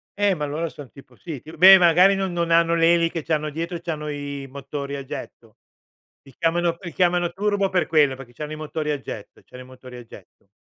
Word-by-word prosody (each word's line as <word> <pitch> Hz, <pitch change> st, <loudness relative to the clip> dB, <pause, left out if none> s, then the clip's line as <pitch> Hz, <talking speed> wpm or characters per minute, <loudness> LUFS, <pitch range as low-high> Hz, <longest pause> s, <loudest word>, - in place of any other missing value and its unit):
Eh, 205 Hz, -1 st, +2 dB
ma 150 Hz, -2 st, -3 dB
allora 155 Hz, +3 st, -3 dB
son 140 Hz, -5 st, -12 dB
tipo 140 Hz, -, -17 dB
sì 155 Hz, -7 st, -8 dB
ti 155 Hz, -, -12 dB
beh, 190 Hz, +3 st, +9 dB
magari 180 Hz, +3 st, +5 dB
non 190 Hz, -1 st, -2 dB
non 170 Hz, -1 st, -1 dB
hanno 170 Hz, 0 st, +4 dB
le 165 Hz, +1 st, +4 dB
eliche, 165 Hz, -2 st, 0 dB
c'hanno 155 Hz, -1 st, -1 dB
dietro 165 Hz, +3 st, -5 dB
c'hanno 150 Hz, -2 st, -5 dB
i 140 Hz, -1 st, -6 dB
motori 140 Hz, +1 st, -6 dB
a 140 Hz, -, -6 dB
getto. -, -, -10 dB, 0.7 s
Li 135 Hz, -, -18 dB
chiamano 170 Hz, 0 st, 0 dB
li 175 Hz, -3 st, -8 dB
chiamano 175 Hz, -1 st, +1 dB
turbo 205 Hz, -1 st, 0 dB
per 180 Hz, -2 st, +1 dB
quello, 145 Hz, -4 st, +3 dB
perché 125 Hz, -2 st, -12 dB
c'hanno 150 Hz, 0 st, -7 dB
i -, -, -5 dB
motori 155 Hz, 0 st, -4 dB
a 145 Hz, -, -2 dB
getto, 105 Hz, -5 st, -9 dB
c'hanno 125 Hz, 0 st, -12 dB
i -, -, -13 dB
motori 130 Hz, -1 st, -13 dB
a 120 Hz, -, -10 dB
getto. 100 Hz, -2 st, -17 dB
160 Hz, 220 wpm, -23 LUFS, 140-175 Hz, 0.7 s, beh